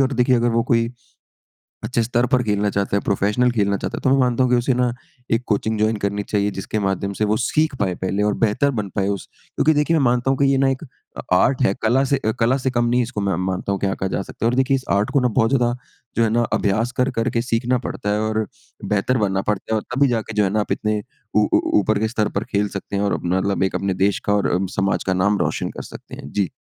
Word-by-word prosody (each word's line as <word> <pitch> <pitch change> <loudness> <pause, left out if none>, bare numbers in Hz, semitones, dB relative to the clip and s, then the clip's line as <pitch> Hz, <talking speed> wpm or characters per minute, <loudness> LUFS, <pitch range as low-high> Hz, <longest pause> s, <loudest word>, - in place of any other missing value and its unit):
ओर 135 0 +2
देखिए 125 0 +3
अगर 120 +1 +2
वो 115 0 +2
कोई 115 -2 +2 1.0
अच्छे 120 -2 0
स्तर 120 +1 +1
पर 125 +1 +2
खेलना 105 -1 0
चाहता 100 0 -1
है, - - -1
प्रोफ़ेशनल 105 +5 +1
खेलना 100 -4 +1
चाहता - - -4
है - - -6
तो 130 - +3
मैं 135 - +4
मानता 125 0 +2
हूँ 125 - +1
कि 125 - +5
उसे 125 +2 +1
ना 125 -1 +1 0.4
एक 115 +2 +2
कोचिंग 110 +1 0
जॉइन 110 +1 +2
करनी 100 0 -2
चाहिए 105 0 0
जिसके 100 +2 -3
माध्यम 100 0 -1
से 105 - +2
वो 105 +1 +1
सीख 155 +3 +1
पाए 95 -3 0
पहले। 95 +2 -1
और 105 - +2
बेहतर 125 +6 +2
बन 100 - -4
पाए 100 -1 +1
उस 100 -2 -3 0.3
क्योंकि 155 +1 +3
देखिए 150 +3 +2
मैं 140 - +2
मानता 125 +2 +2
हूँ 135 - 0
कि 140 - +4
ये 135 0 +3
ना 135 0 +3
एक 135 +4 -2
अ, 130 - -12
आर्ट 130 +8 +3
है, 95 - +3
कला 120 +5 +3
से 140 0 +1
अ 110 - +3
कला 120 +4 +3
से 130 0 -1
कम 120 -1 +1
नहीं 120 +1 +2
है - - +3
इसको 115 -3 -4
मैं 100 -3 0
मानता 95 +1 -2
हूँ 100 - -1
क्या 95 -1 0
कहा 95 - -3
जा - - -1
सकता 115 - -6
है। - - +4
और 125 - -1
देखिए 135 +1 +2
इस 130 - -3
आर्ट 100 +5 +2
को 140 - +6
जो - - -1
है - - +4
ना 115 - -4
बहुत 115 -3 +3 0.7
ज़्यादा 115 +1 +2
अभ्यास 110 +4 0
कर-कर 125 -2 +1
के 115 -1 0
सीखना 120 +1 0
पड़ता 120 -3 -4
है 105 - 0
और 110 0 0 0.4
बेहतर 105 +5 +1
बनना 95 -3 0
पड़ता 105 +2 -2
है। - - +3
और - - -11
तभी 140 +1 +4
जाकर 110 -2 -2
जो 105 - +3
है 95 - +1
ना 105 +2 0
आप - - -5
इतने 105 -1 0 0.3
ऊ 105 0 +4
ऊ - - +6 0.2
ऊपर 105 +1 +1
के 110 - +1
स्तर 110 -2 -1
पर 105 - 0
खेल 105 +1 +1
सकते 100 - -7
हैं 100 - 0
और 100 - +1
अपना 90 +2 -1
मतलब 100 0 0
एक 95 - -1
अपने 100 -1 0
देश 100 0 +2
का 100 - +2
और 100 - +1
अ, 95 +2 +1
समाज 95 0 0
का 95 - 0
नाम 100 +3 +2
रोशन - - -1
कर - - -8
सकते - - -10
हैं। 70 - -10
जी। 100 -4 0
110 Hz, 275 wpm, -21 LUFS, 100-125 Hz, 1.0 s, को